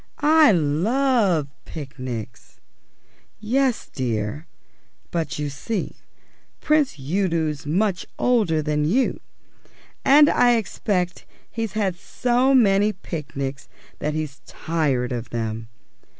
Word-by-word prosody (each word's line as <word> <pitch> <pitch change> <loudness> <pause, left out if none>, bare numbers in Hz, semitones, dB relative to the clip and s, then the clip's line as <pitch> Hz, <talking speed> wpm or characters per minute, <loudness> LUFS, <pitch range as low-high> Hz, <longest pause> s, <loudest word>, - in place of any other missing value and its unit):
"I 310 -2 +6
love 185 - +2 0.2
picnics." 130 -7 -8 0.8
"Yes, 250 +3 0
dear; 115 +3 -3 0.6
but, 165 -4 -2
you 150 0 -2
see, 195 +10 -4 0.6
Prince 305 - +2
Udo's 160 -1 -1
much 185 +3 0
older 205 -11 +2
than 150 0 0
you, 225 - +1 0.8
and 290 +2 +7
I 245 -4 +4
expect 185 -4 -2 0.2
he's 225 -3 -3
had 200 -4 0
so 250 +7 +1
many 205 -3 +4
picnics 140 -6 -6 0.3
that 150 0 -2
he's 155 -2 -4
tired 140 -7 -1
of 120 -2 -4
them. 115 -1 -4
170 Hz, 100 wpm, -23 LUFS, 145-225 Hz, 0.8 s, and